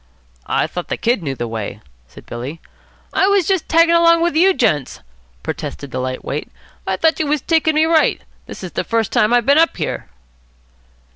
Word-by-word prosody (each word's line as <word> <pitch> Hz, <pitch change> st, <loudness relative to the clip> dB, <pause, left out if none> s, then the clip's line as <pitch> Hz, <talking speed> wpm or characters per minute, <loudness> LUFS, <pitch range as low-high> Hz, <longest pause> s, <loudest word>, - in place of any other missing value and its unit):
"I -, -, +1 dB
thought 180 Hz, -, -6 dB
the -, -, -3 dB
Kid 235 Hz, -3 st, 0 dB
knew 140 Hz, -4 st, -3 dB
the 120 Hz, -1 st, -4 dB
way," 110 Hz, -2 st, -5 dB, 0.3 s
said -, -, -15 dB
Billy. 130 Hz, +7 st, -7 dB, 0.5 s
"I 380 Hz, -, +3 dB
was 400 Hz, -4 st, +2 dB
just 380 Hz, -3 st, 0 dB
taggin' 335 Hz, +1 st, +4 dB
along 335 Hz, 0 st, +5 dB
with 345 Hz, -3 st, 0 dB
you 365 Hz, +4 st, +5 dB
gents," 175 Hz, -, 0 dB, 0.4 s
protested 140 Hz, -2 st, -6 dB
the 130 Hz, -, -3 dB
light 130 Hz, 0 st, -4 dB
weight, 150 Hz, -, -4 dB, 0.4 s
"I 190 Hz, 0 st, 0 dB
thought 320 Hz, +7 st, +2 dB
you 310 Hz, -, 0 dB
was 295 Hz, -1 st, 0 dB
taking 320 Hz, 0 st, +1 dB
me 310 Hz, +1 st, +4 dB
right. 320 Hz, -1 st, +3 dB, 0.3 s
This -, -, -9 dB
is -, -, -6 dB
the -, -, -2 dB
first 225 Hz, -3 st, -1 dB
time 215 Hz, +2 st, +2 dB
I 245 Hz, 0 st, +4 dB
been 280 Hz, +6 st, +4 dB
up 330 Hz, -, +2 dB
here." -, -, -4 dB
250 Hz, 200 wpm, -18 LUFS, -, 0.5 s, along